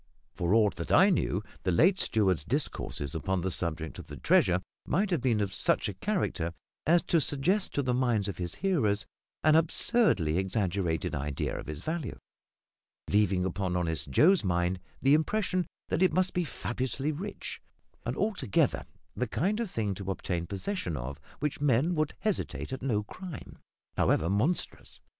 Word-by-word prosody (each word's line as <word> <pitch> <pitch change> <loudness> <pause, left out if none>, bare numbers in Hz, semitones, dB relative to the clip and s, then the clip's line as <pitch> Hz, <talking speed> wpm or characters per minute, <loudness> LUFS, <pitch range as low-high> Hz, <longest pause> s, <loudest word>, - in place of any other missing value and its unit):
For 90 +3 +1
aught 105 -4 +3
that 85 - -4
I 195 +2 +6
knew, 105 - 0 0.2
the 90 - 0
late 180 - +4
steward's 95 -8 +2
discourses 85 - -2
upon 95 +3 -1
the 95 +2 -1
subject 80 -2 -3
of - - -10
the 75 0 -8
treasure - - +3 0.3
might 195 +6 +1
have 170 -7 +1
been 120 -4 +2
of 100 -2 -1
such 90 - +2
a 105 - -3
character 95 - -1 0.3
as 170 +2 +5
to 165 - +2
suggest 175 +9 +1
to 145 - +1
the 125 -1 0
minds 120 -5 +1
of 95 -3 -5
his 85 -2 -4
hearers 110 - +1 0.4
an 155 - +5
absurdly 160 - +3
exaggerated 95 -4 -1
idea 70 0 -2
of - - -6
its 75 +2 -6
value, 160 -7 -3 0.9
leaving 100 -3 +3
upon 95 0 -2
honest 80 -5 -2
Joe's 175 - +5
mind 90 0 0 0.2
the 135 +2 +5
impression 180 +2 +1 0.2
that 160 - 0
it 185 - +4
must 185 0 +2
be 180 -1 0
fabulously 130 +1 -2
rich, 185 +8 -6 0.4
and - - -3
altogether 205 - +1 0.3
the 125 - -1
kind 195 - 0
of 230 -4 -2
thing 105 - -1
to 95 0 -6
obtain 90 -3 -2
possession 100 - -3
of 65 +4 -6 0.2
which 150 -1 -2
men 145 +4 +3
would 155 -2 -1
hesitate 200 -9 -2
at 130 - -5
no 115 -6 0
crime, 175 - -9 0.4
however 85 +4 +2
monstrous. 125 - 0
110 Hz, 165 wpm, -29 LUFS, -, 0.9 s, I